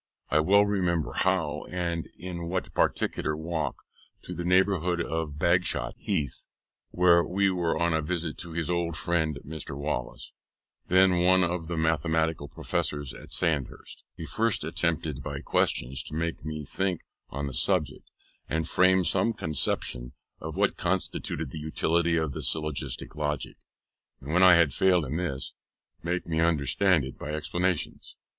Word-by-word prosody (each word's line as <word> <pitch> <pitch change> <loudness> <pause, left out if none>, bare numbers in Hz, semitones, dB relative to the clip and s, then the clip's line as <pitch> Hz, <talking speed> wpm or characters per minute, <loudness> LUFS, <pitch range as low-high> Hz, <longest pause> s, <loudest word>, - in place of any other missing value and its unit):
I 75 - +4
well 100 +6 +5
remember 90 -6 0
how, 75 +1 0
and 85 -2 -2
in 85 -1 -5
what 90 +2 -3
particular 75 -1 0
walk, 80 -3 -3 0.4
in 90 - -5
the 85 - -4
neighbourhood 90 -1 +2
of 80 -3 -2
Bagshot 85 -7 +1
Heath 70 -2 -3 0.4
(where 85 -1 +5
we 100 +2 +1
were 85 -3 0
on 85 0 +1
a 80 - +1
visit 80 0 -2
to 85 - -6
his 85 -1 -2
old 85 -2 -1
friend 80 -4 0
Mr. 75 -2 -6
Wallace, 70 -4 -4 0.6
then 95 -1 +5
one 95 0 +5
of 85 -1 -1
the 85 -1 -3
Mathematical 80 -1 +1
Professors 75 -1 -2
at - - -12
Sandhurst) 75 -7 -2
he - - -6
first 115 -6 +1
attempted 80 -3 -1
by 70 -1 -5
questions 65 -1 +1
to 75 - -6
make 85 +1 -2
me 75 -1 -5
think 95 +3 -1 0.3
on 70 +1 -4
the 70 - -5
subject, 75 +2 0 0.4
and 80 0 -1
frame 90 +1 +4
some 115 - +2
conception 65 - -2 0.3
of 80 0 -6
what 100 0 +2
constituted 85 -5 -1
the 80 - -6
utility 85 +2 +1
of 80 -3 0
the - - -5
syllogistic 75 -1 -2
logic, 75 -2 -3 0.6
and 70 +4 -6
when 90 - +4
I 90 -2 +9
had 85 -5 +4
failed 90 -2 +3
in 70 +4 -3
this, 75 -7 -3 0.5
to - - -18
make 90 +1 -1
me 80 -1 -1
understand 80 +1 +3
it 65 - -9
by 75 +1 -4
explanations. 90 +2 -2
80 Hz, 155 wpm, -28 LUFS, 75-90 Hz, 0.6 s, I